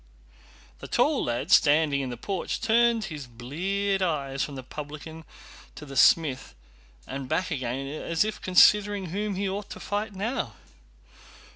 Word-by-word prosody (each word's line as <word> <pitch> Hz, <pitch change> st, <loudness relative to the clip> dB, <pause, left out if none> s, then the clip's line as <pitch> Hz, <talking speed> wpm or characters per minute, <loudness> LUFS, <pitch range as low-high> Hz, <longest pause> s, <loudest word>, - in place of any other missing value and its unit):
The -, -, -8 dB
tall -, -, +2 dB
lad, 120 Hz, 0 st, -2 dB
standing 145 Hz, -1 st, +4 dB
in 130 Hz, -, -3 dB
the 120 Hz, -, -6 dB
porch, 190 Hz, -, -3 dB
turned 230 Hz, 0 st, +3 dB
his 150 Hz, -8 st, -6 dB
bleared 190 Hz, +12 st, -2 dB
eyes 140 Hz, -6 st, -1 dB
from 145 Hz, -, -5 dB
the 130 Hz, -, -7 dB
publican 155 Hz, +4 st, -8 dB, 0.5 s
to 150 Hz, -, -9 dB
the 135 Hz, -1 st, -9 dB
smith 135 Hz, -, +3 dB, 0.5 s
and 135 Hz, 0 st, -6 dB
back 170 Hz, +4 st, -1 dB
again 130 Hz, -2 st, -3 dB
as 160 Hz, +5 st, -1 dB
if 215 Hz, 0 st, -5 dB
considering 195 Hz, 0 st, +4 dB
whom 205 Hz, +1 st, -2 dB
he 195 Hz, +1 st, -1 dB
ought 200 Hz, +1 st, -4 dB
to -, -, -8 dB
fight 205 Hz, 0 st, -3 dB
now. 225 Hz, +8 st, -3 dB
160 Hz, 150 wpm, -27 LUFS, 140-200 Hz, 0.5 s, standing